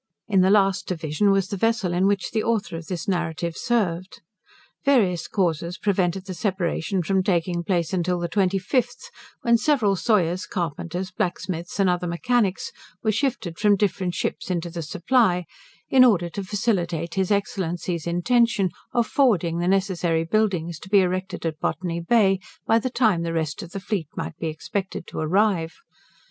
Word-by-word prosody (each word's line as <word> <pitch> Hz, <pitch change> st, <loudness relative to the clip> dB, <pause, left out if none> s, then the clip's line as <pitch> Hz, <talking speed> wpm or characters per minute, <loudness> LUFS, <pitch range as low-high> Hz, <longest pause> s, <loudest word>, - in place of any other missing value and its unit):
In 195 Hz, -3 st, +3 dB
the 185 Hz, -, +4 dB
last 195 Hz, -3 st, +3 dB
division 165 Hz, +2 st, 0 dB
was 195 Hz, -1 st, +2 dB
the 200 Hz, -, -3 dB
vessel, 220 Hz, -4 st, +1 dB
in 185 Hz, +2 st, +2 dB
which 200 Hz, -1 st, 0 dB
the 220 Hz, -, 0 dB
author 220 Hz, -6 st, -1 dB
of 165 Hz, -1 st, -7 dB
this 175 Hz, -3 st, -4 dB
narrative 170 Hz, -2 st, -2 dB
served. 185 Hz, -6 st, -1 dB, 0.6 s
Various 205 Hz, -, +2 dB
causes 170 Hz, -2 st, -1 dB
prevented 190 Hz, -2 st, 0 dB
the 190 Hz, -, -5 dB
separation 185 Hz, -1 st, -1 dB
from 190 Hz, +3 st, +1 dB
taking 175 Hz, -2 st, 0 dB
place 170 Hz, -1 st, 0 dB
until 180 Hz, 0 st, 0 dB
the 175 Hz, -, -2 dB
25th, 200 Hz, +7 st, 0 dB, 0.3 s
when 235 Hz, -1 st, +4 dB
several 235 Hz, -9 st, +2 dB
sawyers, 185 Hz, -3 st, +1 dB
carpenters, 175 Hz, 0 st, -3 dB
blacksmiths, 175 Hz, -1 st, -3 dB
and 195 Hz, -, +4 dB
other 180 Hz, 0 st, 0 dB
mechanics, 200 Hz, +3 st, 0 dB, 0.3 s
were 215 Hz, -, +2 dB
shifted 215 Hz, -, -2 dB
from 205 Hz, -1 st, +4 dB
different 190 Hz, -3 st, -1 dB
ships -, -, -3 dB
into 175 Hz, -1 st, -2 dB
the 170 Hz, 0 st, -5 dB
'Supply', 180 Hz, -, +1 dB, 0.4 s
in 260 Hz, -1 st, +6 dB
order 185 Hz, -9 st, +4 dB
to 200 Hz, -, -4 dB
facilitate 180 Hz, -5 st, -1 dB
his 190 Hz, -1 st, 0 dB
Excellency's 175 Hz, -4 st, -1 dB
intention 200 Hz, +2 st, +2 dB, 0.2 s
of 240 Hz, -1 st, +2 dB
forwarding 180 Hz, -, +2 dB
the 175 Hz, -, 0 dB
necessary 180 Hz, -4 st, +1 dB
buildings 175 Hz, -4 st, 0 dB
to 190 Hz, -, -12 dB
be 200 Hz, -1 st, +6 dB
erected 185 Hz, -1 st, -2 dB
at 160 Hz, -1 st, -2 dB
Botany 170 Hz, +1 st, -2 dB
Bay, 195 Hz, +1 st, +3 dB, 0.3 s
by 225 Hz, -, +4 dB
the 255 Hz, -, -2 dB
time 220 Hz, -8 st, +2 dB
the 165 Hz, 0 st, -2 dB
rest 160 Hz, -3 st, -2 dB
of 175 Hz, -, -8 dB
the 195 Hz, -, -6 dB
fleet 190 Hz, -5 st, -3 dB
might -, -, -5 dB
be 165 Hz, -, -2 dB
expected 180 Hz, +4 st, -4 dB
to -, -, -7 dB
arrive. 175 Hz, 0 st, +1 dB
185 Hz, 165 wpm, -24 LUFS, 170-205 Hz, 0.6 s, in